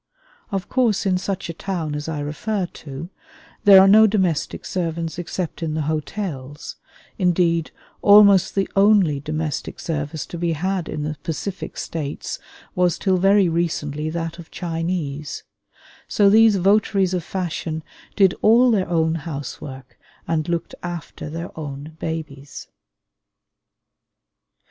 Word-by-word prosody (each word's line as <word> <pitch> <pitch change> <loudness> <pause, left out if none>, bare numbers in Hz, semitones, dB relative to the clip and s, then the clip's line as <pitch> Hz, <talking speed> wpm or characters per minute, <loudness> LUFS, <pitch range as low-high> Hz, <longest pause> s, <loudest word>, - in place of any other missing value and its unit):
Of 195 -2 -2
course 240 -7 +1
in 185 -2 +2
such 190 0 -3
a 170 - -5
town 165 -3 -3
as 150 +2 -4
I 150 -2 -3
refer 185 +7 -2
to, 160 0 -9 0.5
there 195 -2 +10
are 190 - +7
no 215 +2 +7
domestic 190 -7 0
servants 165 -2 -3
except 175 0 -4
in 155 -2 -2
the 155 - -1
hotels 150 -2 -4 0.4
(indeed, 170 -3 +2 0.3
almost 200 -2 +6
the 195 -1 +1
only 195 -7 +4
domestic 155 +1 -4
service 150 -1 -3
to 170 - -8
be 170 -1 0
had 185 +2 -2
in 150 - -3
the 150 0 -3
Pacific 180 +4 -5
States 150 -3 -4 0.3
was 180 -2 +2
till 190 -2 +1
very 195 +1 +4
recently 155 -3 -1
that 165 +1 -4
of 165 - -11
Chinese), 165 -4 -3 0.6
so 200 -1 +4
these 220 0 +6
votaries 195 0 +2
of 180 -2 -1
fashion 165 -3 -4 0.3
did 190 -3 +5
all 240 +3 +6
their 190 -5 +1
own 160 -2 +2
housework 140 -4 -7 0.3
and 160 0 -1
looked 170 -1 -2
after 175 -4 -6
their 165 +3 -6
own 150 0 -7
babies. 150 -4 -6
170 Hz, 135 wpm, -22 LUFS, 155-190 Hz, 0.6 s, there